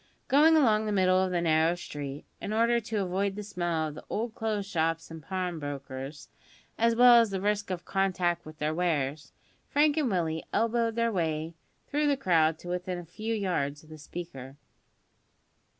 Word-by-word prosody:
Going 315 +4 +6
along 220 -7 +3
the - - 0
middle 185 -2 +3
of 190 - +1
the 175 -1 0
narrow 160 +1 +3
street, 145 -4 -7 0.2
in 210 - -3
order 235 +2 +3
to 215 -2 -2
avoid 190 +2 -1
the 210 - -5
smell 175 -5 -1
of 150 - -6
the 155 - -10
old 225 +1 -2
clothes' 215 -3 -2
shops 165 -3 -1
and 160 -1 -8
pawnbrokers, 145 -5 -5 0.5
as 230 0 +2
well 240 0 +8
as 230 - +1
the 195 -1 -2
risk 205 +1 -1
of 180 -2 -4
contact 185 -3 0
with 155 0 -11
their 155 +1 -1
wares, 150 -4 -1 0.4
Frank 295 +1 +3
and 290 -5 +2
Willie 165 -4 -1
elbowed 230 0 +1
their 230 0 +1
way 160 -3 -1 0.3
through 295 +1 0
the 285 -1 +2
crowd 165 - +3
to 175 - -12
within 180 0 -3
a 175 - -7
few 215 +7 -4
yards 155 -8 -2
of 155 - -18
the 155 0 -11
speaker. 145 -4 -8
180 Hz, 180 wpm, -29 LUFS, 160-215 Hz, 0.5 s, well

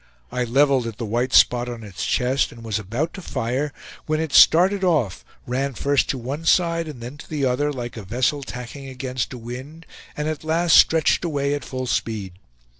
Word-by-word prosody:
I 125 - -1
leveled 135 0 +3
at 115 -2 -7
the 115 - -4
white 120 +4 -1
spot 125 0 +4
on 120 -2 -7
its 100 -4 -6
chest, 130 +2 +1
and 115 0 -12
was 110 -2 -2
about 115 - -3
to 190 - -8
fire 135 0 -2 0.4
when 155 0 0
it 160 -3 -3
started 190 +4 +6
off, 150 - +1 0.2
ran 130 +2 -2
first 140 +1 +1
to 135 - 0
one 135 +6 -5
side 170 -1 +2
and 140 -6 -8
then 125 +5 -8
to - - -12
the 150 -3 -1
other, 140 +4 +1
like 120 -4 -6
a - - -5
vessel 125 +8 0
tacking 130 +1 -8
against 130 -1 -4
a 125 - -6
wind, 130 +8 -9 0.3
and 150 0 -2
at 155 -1 -3
last 165 +2 +3
stretched 160 +2 +5
away 145 -4 0
at 145 -2 -3
full 130 -1 -4
speed. 110 -6 -2
130 Hz, 200 wpm, -22 LUFS, 120-150 Hz, 0.4 s, started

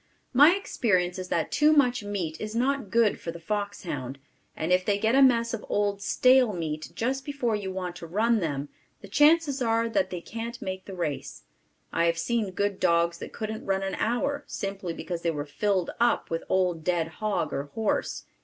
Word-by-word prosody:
My 290 +7 +7
experience 185 - 0
is 185 - -5
that 165 -3 -1
too 300 +1 +4
much 250 -6 +3
meat 190 -6 -4
is 215 +1 -5
not 265 -2 0
good 230 +1 +3
for - - -6
the 170 - -6
foxhound, 170 -9 -4 0.4
and 160 +3 -2
if 185 0 +3
they 200 +1 +1
get 220 +3 +1
a 270 - +5
mess 235 -3 +4
of 225 - -4
old 205 -1 0
stale 255 +1 +4
meat 155 -3 -4
just 265 +3 -1
before 260 -6 -1
you 200 -2 -4
want 180 -2 -4
to 170 - -8
run 220 +6 +2
them, 145 -5 -3 0.3
the - - -10
chances 295 -2 +4
are 230 -1 +2
that 190 -4 0
they 180 - -4
can't 230 +6 -6
make 190 -5 -5
the 195 - -8
race. 155 -6 -4 0.5
I 170 - +2
have 170 0 +2
seen 220 +4 0
good 200 +1 -1
dogs 170 0 +2
that - - -7
couldn't 220 0 -5
run 195 0 +1
an 195 -1 -2
hour, 280 +8 -1
simply 195 -3 -4
because 170 0 -5
they 170 - 0
were 145 -3 -3
filled 185 +4 0
up 240 -6 +2
with 165 - -2
old 180 -4 +1
dead 170 -1 +1
hog 215 -2 -1
or 140 +1 -2
horse. 220 +9 -2
200 Hz, 200 wpm, -27 LUFS, 175-235 Hz, 0.5 s, My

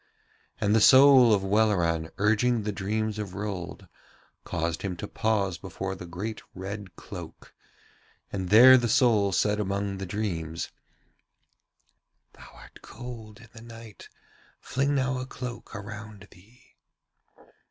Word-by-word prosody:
And 105 0 +1
the 110 - +4
soul 130 -1 +7
of 100 -2 +2
Welleran 95 -6 +1
urging 110 +3 +2
the 105 - -2
dreams 105 +2 -3
of 100 -3 -6
Rold 95 -2 -6 0.6
caused 85 -1 -3
him 95 -3 -4
to 105 - -6
pause 100 -7 -1
before 95 +3 -5
the 90 -2 -9
great 105 +6 -6
red 95 -1 -7
cloak, - - -11 0.8
and 95 -2 -3
there 125 +5 +9
the 120 -1 -1
soul 115 -5 +3
said 105 +2 +1
among 100 -1 -2
the 95 - -5
dreams: 85 -5 -4 1.6
'Thou - - -15
art - - -16
cold 115 -3 -10
in 115 - -16
the 115 - -12
night; 115 -2 -12 0.5
fling 140 +2 -1
now 130 -1 0
a 130 - -6
cloak 125 -3 -8
around 105 0 -9
thee.' 105 +8 -22
105 Hz, 130 wpm, -27 LUFS, 95-115 Hz, 1.6 s, there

